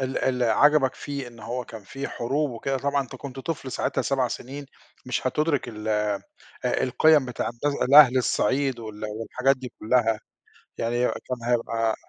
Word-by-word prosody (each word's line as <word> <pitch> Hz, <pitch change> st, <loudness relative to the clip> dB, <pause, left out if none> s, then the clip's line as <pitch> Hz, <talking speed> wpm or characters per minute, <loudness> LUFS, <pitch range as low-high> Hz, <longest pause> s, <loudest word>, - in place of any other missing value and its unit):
ال 130 Hz, 0 st, -1 dB
ال 125 Hz, -1 st, 0 dB
عجبك 135 Hz, +3 st, +4 dB
فيه 140 Hz, -3 st, -5 dB
إن 115 Hz, -1 st, -15 dB
هو 120 Hz, +3 st, -4 dB
كان 110 Hz, -2 st, -10 dB
في 135 Hz, +7 st, -6 dB
حروب 140 Hz, +5 st, -1 dB
وكده 135 Hz, +3 st, -2 dB
طبعًا 140 Hz, 0 st, 0 dB
أنت 130 Hz, 0 st, -10 dB
كنت 135 Hz, 0 st, -8 dB
طفل 135 Hz, -3 st, -4 dB
ساعتها -, -, -1 dB
7 130 Hz, -3 st, +1 dB
سنين 140 Hz, +5 st, -7 dB, 0.4 s
مش 125 Hz, -, -2 dB
هتدّرك 150 Hz, -2 st, 0 dB
ال 110 Hz, -1 st, -6 dB
آآ، 105 Hz, -2 st, 0 dB, 0.4 s
القِيَم 145 Hz, +2 st, +3 dB
بتاعة 125 Hz, -2 st, -3 dB
د 120 Hz, +5 st, -5 dB, 0.2 s
الأهل 135 Hz, -2 st, +8 dB
الصعيد 130 Hz, 0 st, +1 dB
وال 110 Hz, -1 st, -7 dB
والحاجات 115 Hz, +5 st, 0 dB
دي 125 Hz, -2 st, -8 dB
كُلّها، 115 Hz, -1 st, +2 dB, 0.6 s
يعني 120 Hz, +2 st, 0 dB
كان 125 Hz, -2 st, -5 dB
هيبقى 115 Hz, -2 st, +1 dB
125 Hz, 165 wpm, -25 LUFS, 115-135 Hz, 0.6 s, الأهل